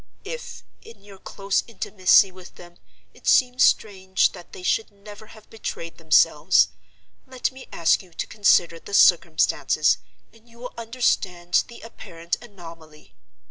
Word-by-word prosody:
"If, 480 Hz, +3 st, -8 dB, 0.2 s
in 455 Hz, -, -16 dB
your 200 Hz, -2 st, -15 dB
close 195 Hz, 0 st, -2 dB
intimacy 195 Hz, -3 st, +3 dB
with 185 Hz, -1 st, -15 dB
them, 175 Hz, 0 st, -15 dB, 0.4 s
it -, -, -15 dB
seems 250 Hz, 0 st, +3 dB
strange 190 Hz, -3 st, +1 dB
that 175 Hz, -, -14 dB
they 180 Hz, -, -11 dB
should 220 Hz, +4 st, 0 dB
never 205 Hz, +1 st, -14 dB
have 215 Hz, -1 st, -17 dB
betrayed 170 Hz, -7 st, -7 dB
themselves, 160 Hz, -1 st, +3 dB, 0.6 s
let 260 Hz, -1 st, -3 dB
me 260 Hz, 0 st, -13 dB
ask 165 Hz, -1 st, +2 dB
you 185 Hz, -3 st, -19 dB
to -, -, -5 dB
consider 175 Hz, -5 st, +2 dB
the 200 Hz, -, -6 dB
circumstances -, -, +3 dB, 0.3 s
and 225 Hz, +1 st, -23 dB
you 230 Hz, -, -20 dB
will 245 Hz, +1 st, -9 dB
understand 200 Hz, -7 st, -1 dB
the 235 Hz, -, -13 dB
apparent 170 Hz, -6 st, -6 dB
anomaly. 165 Hz, -8 st, -14 dB
200 Hz, 140 wpm, -23 LUFS, 175-230 Hz, 0.6 s, intimacy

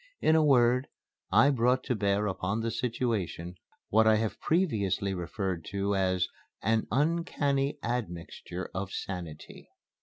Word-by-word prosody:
In 160 Hz, -, +4 dB
a 160 Hz, -, +5 dB
word, 125 Hz, -2 st, +4 dB, 0.4 s
I 140 Hz, -, +6 dB
brought 125 Hz, 0 st, +2 dB
to 125 Hz, -, -1 dB
bear 100 Hz, 0 st, +1 dB
upon 100 Hz, +2 st, -1 dB
the 115 Hz, 0 st, -1 dB
situation 115 Hz, -7 st, -2 dB, 0.4 s
what 110 Hz, 0 st, +4 dB
I 110 Hz, -, +6 dB
have 110 Hz, 0 st, -1 dB
previously 100 Hz, -, +1 dB
referred 95 Hz, -1 st, -3 dB
to 100 Hz, +1 st, -1 dB
as 95 Hz, -1 st, +1 dB, 0.4 s
"an 110 Hz, +1 st, +1 dB
uncanny 145 Hz, -1 st, +1 dB
admixture 95 Hz, -5 st, -4 dB
of 95 Hz, +1 st, -4 dB
sanity." 85 Hz, -5 st, -7 dB
110 Hz, 130 wpm, -29 LUFS, 95-125 Hz, 0.4 s, I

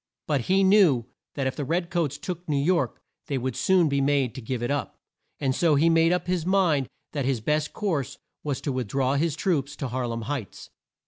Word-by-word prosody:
But 145 Hz, -4 st, +1 dB
he 190 Hz, +9 st, +2 dB
knew 190 Hz, -, +5 dB, 0.3 s
that 140 Hz, -, -1 dB
if 130 Hz, -, -1 dB
the 145 Hz, -, -3 dB
red 170 Hz, +5 st, -1 dB
coats 155 Hz, -5 st, 0 dB
took 175 Hz, +1 st, -6 dB
New 145 Hz, -, +1 dB
York 170 Hz, +5 st, +1 dB, 0.3 s
they 140 Hz, -, -1 dB
would 130 Hz, -1 st, -2 dB
soon 185 Hz, -3 st, +3 dB
be 140 Hz, -1 st, +1 dB
made 135 Hz, -3 st, +1 dB
to 130 Hz, -, -7 dB
give 120 Hz, +1 st, -3 dB
it 120 Hz, -, -1 dB
up, 145 Hz, -, -3 dB, 0.4 s
and 135 Hz, -2 st, +1 dB
so 160 Hz, +1 st, +3 dB
he 165 Hz, +4 st, +4 dB
made 165 Hz, +1 st, +4 dB
up 180 Hz, -1 st, 0 dB
his 180 Hz, -2 st, 0 dB
mind 175 Hz, -7 st, +2 dB, 0.2 s
that 140 Hz, -4 st, -2 dB
his 130 Hz, -3 st, +1 dB
best 150 Hz, +6 st, 0 dB
course 165 Hz, -, -2 dB, 0.3 s
was 145 Hz, -4 st, -2 dB
to 145 Hz, -, -2 dB
with 130 Hz, -3 st, -2 dB
draw 135 Hz, +3 st, 0 dB
his 150 Hz, +1 st, +1 dB
troops, 145 Hz, -6 st, -1 dB
to 135 Hz, -, -4 dB
Har 125 Hz, 0 st, -2 dB
lem 115 Hz, -1 st, -4 dB
Heights. 135 Hz, -5 st, -6 dB
145 Hz, 220 wpm, -26 LUFS, 130-170 Hz, 0.4 s, knew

